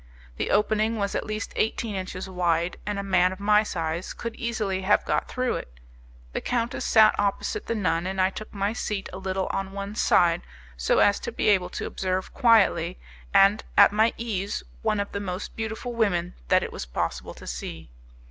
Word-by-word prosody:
The - - -2
opening 215 +2 +2
was 200 -1 -1
at - - -2
least 215 +1 -4
eighteen 220 0 0
inches 185 0 -5
wide, 175 -2 0
and 205 -1 -1
a 200 - -2
man 185 -2 +3
of 190 - -7
my 210 +1 +4
size 170 -4 -3
could 230 -1 -6
easily 215 -5 -2
have 200 +2 +3
got - - 0
through 255 -1 -1
it. - - -10 0.5
The - - -2
countess 240 -1 -1
sat 220 -2 +6
opposite 205 - -1
the 230 - -1
nun, 180 -4 0
and 190 0 -3
I 185 +1 +3
took 215 +2 -8
my 200 +1 -1
seat 210 -4 -3
a 185 - -6
little 190 0 -2
on 195 0 -3
one 200 +1 -5
side 175 -5 +3 0.3
so - - +1
as 205 - +4
to - - -5
be 225 - +1
able 185 -3 +3
to - - -5
observe 185 0 -2
quietly 195 -8 +4 0.3
and 200 +2 +5
at - - +8
my 220 +2 +3
ease 205 -4 -3 0.2
one 210 - +1
of 200 - -2
the 200 - -3
most 190 -1 -5
beautiful 225 +2 -4
women 180 -6 0
that - - +4
it - - -5
was 65 - -6
possible - - -3
to - - -12
see. 60 +4 -6
200 Hz, 195 wpm, -26 LUFS, 185-215 Hz, 0.5 s, at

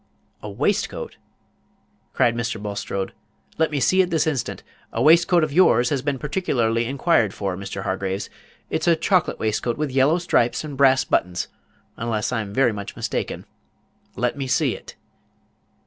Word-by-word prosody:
"A 105 - -6
waistcoat!" 100 - -2 0.9
cried 115 -1 +2
Mr. 115 -1 -2
Bulstrode; 100 -1 -4 0.5
"let 160 - +3
me 150 -2 -2
see 185 +10 +4
it 180 - 0
this 160 -4 +1
instant. 145 -6 -2 0.3
A - - -3
waistcoat 170 +2 +5
of 155 -2 -1
yours 145 -8 +4
has 140 -3 0
been 140 0 -1
particularly 120 -7 0
inquired 135 - +1
for, 95 -2 -2
Mr. 95 0 -6
Hargraves. 95 +1 -2 0.4
It's 160 - -1
a 170 - +6
chocolate 180 +1 +1
waistcoat, 110 +2 -1
with 150 -2 -2
yellow 135 +5 +3
stripes 160 -9 +1
and 150 -2 -6
brass 135 -1 +4
buttons, 90 0 -1 0.5
unless 115 -2 -2
I'm 110 -5 -2
very 120 +3 +3
much 100 -2 -7
mistaken. - - -3 0.7
Let 125 0 0
me 135 -2 -4
see 125 - +1
it." - - -12
125 Hz, 155 wpm, -23 LUFS, 105-155 Hz, 0.9 s, a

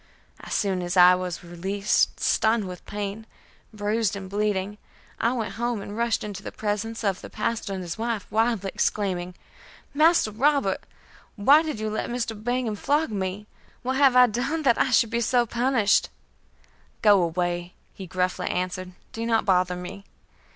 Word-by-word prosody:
As - - -5
soon 195 -3 0
as 175 +1 -2
I 180 0 +8
was 180 -2 -3
released, 190 +5 0
stunned 220 -2 +2
with 180 -1 -8
pain, 205 +2 -5 0.4
bruised 210 0 -1
and 195 -1 -7
bleeding, 205 0 -1 0.4
I 230 - +2
went 230 -4 -3
home 240 -2 0
and 200 +1 -7
rushed 235 -1 0
into 205 -2 -6
the - - -7
presence 220 +2 -3
of 195 -3 0
the - - -9
pastor 220 -1 -2
and 190 -1 -4
his 175 +4 -6
wife, 225 -3 -2
wildly 220 -3 +1
exclaiming: 180 -3 -1 0.6
"Master 310 -5 +4
Robert, 270 -2 +1 0.5
why 275 +9 +6
did 310 -8 -4
you 215 0 -2
let 215 - -3
Mr. 240 -2 -2
Bingham 240 +1 -2
flog 290 +5 0
me? 195 0 -3 0.4
What 260 +1 -1
have 270 -2 +5
I 250 0 +8
done 265 +8 -2
that 240 -5 +3
I - - +2
should 230 -2 +3
be 235 0 0
so 240 +1 +2
punished?" 235 -3 +2 0.9
"Go 205 -3 +6
away," 175 +1 -2 0.2
he 190 - -9
gruffly 180 +1 -1
answered, 185 0 -3 0.2
"do 225 - -5
not 230 -1 +1
bother 180 -1 +2
me." 180 +2 -8
210 Hz, 165 wpm, -25 LUFS, 185-235 Hz, 0.9 s, I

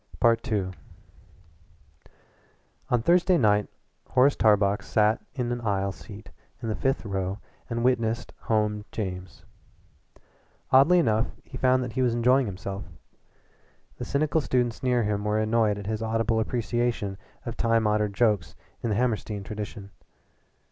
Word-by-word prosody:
II 115 -5 +2 2.2
On 120 -2 +1
Thursday 180 +3 +4
night 105 -6 +3 0.4
Horace 135 +3 +4
Tarbox 105 -2 +3
sat 110 +1 +2
in 125 -3 -2
an 120 0 -3
aisle 100 -3 0
seat 105 +2 -12 0.3
in 115 -1 -4
the 110 - -1
fifth 135 -3 -1
row 95 -1 -2 0.3
and 120 0 -2
witnessed 115 -2 0
"Home 105 -1 0
James." 95 -4 -6 1.3
Oddly 140 +7 +6
enough 115 -8 +2 0.2
he - - -12
found 130 0 +2
that 120 -3 -6
he 130 - 0
was 120 -2 +2
enjoying 125 +2 +3
himself. 100 +1 -5 1.1
The - - -5
cynical 155 +2 +1
students 125 -4 0
near 125 -2 +2
him 105 -1 -1
were 105 0 0
annoyed 110 -1 +2
at 100 - -7
his 110 +1 -2
audible 115 0 0
appreciation 120 -3 -1 0.3
of 120 -1 -4
time 115 -1 +2
honored 105 -1 +1
jokes 105 -7 +1 0.3
in 115 - -2
the 105 - +1
Hammerstein 110 -3 -1
tradition. 105 -1 -7
110 Hz, 135 wpm, -26 LUFS, 105-120 Hz, 2.2 s, Oddly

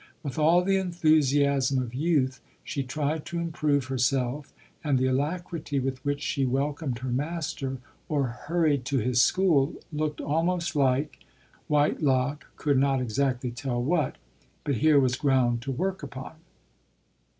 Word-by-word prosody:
With 140 -1 -4
all 165 +4 +5
the 195 +1 +2
enthusiasm 145 -6 +2
of 125 -2 -4
youth, 135 -3 +1 0.2
she 145 - -3
tried 150 +4 -2
to 170 0 -4
improve 155 -5 0
herself, 130 +2 -1 0.3
and 145 -4 +2
the 130 - +1
alacrity 150 +2 -1
with 130 0 -3
which 145 +1 -2
she 140 - 0
welcomed 135 +1 -1
her 125 +1 -4
master, 140 -1 -3 0.3
or 145 -3 +1
hurried 145 +3 0
to 135 0 0
his 125 +1 +2
school, 165 -6 +3 0.2
looked 150 0 -2
almost 170 +2 0
like 135 0 +1 0.2
— - - -32
Whitelock 145 -2 +1
could 145 -3 +1
not 135 -1 +2
exactly 125 +1 -1
tell 120 +1 -3
what, 150 +2 0 0.5
but 140 -4 -1
here 155 +2 +5
was 130 -2 +2
ground 130 -4 +2
to 135 +2 -4
work 190 +8 -2
upon. 135 -1 -8
140 Hz, 145 wpm, -27 LUFS, 130-155 Hz, 0.5 s, all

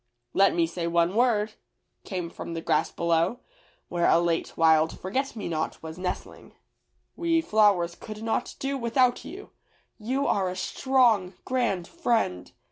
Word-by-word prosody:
"Let 195 -2 +4
me 170 -1 +3
say 170 +1 -4
one 170 +1 +2
word," 220 -2 +2 0.5
came 180 -3 -4
from 170 - -7
the 165 - -3
grass - - +1
below, 170 +6 0 0.5
where 170 -1 +1
a 165 - +5
late 170 -1 -1
wild 160 -1 +3
forget 260 +9 -2
me 210 - -5
not 160 -1 -3
was 160 +2 -8
nestling. 180 0 -6 0.6
"We 335 -1 +1
flowers 205 - +3
could 215 +4 -9
not 225 - -2
do 275 0 -2
without 245 +1 +2
you. 395 +3 -10 0.5
You 260 +6 -1
are 190 -2 +1
a 180 - -5
strong, 225 -4 +2
grand 235 -9 0
friend. 235 - -1
195 Hz, 150 wpm, -26 LUFS, 170-245 Hz, 0.6 s, a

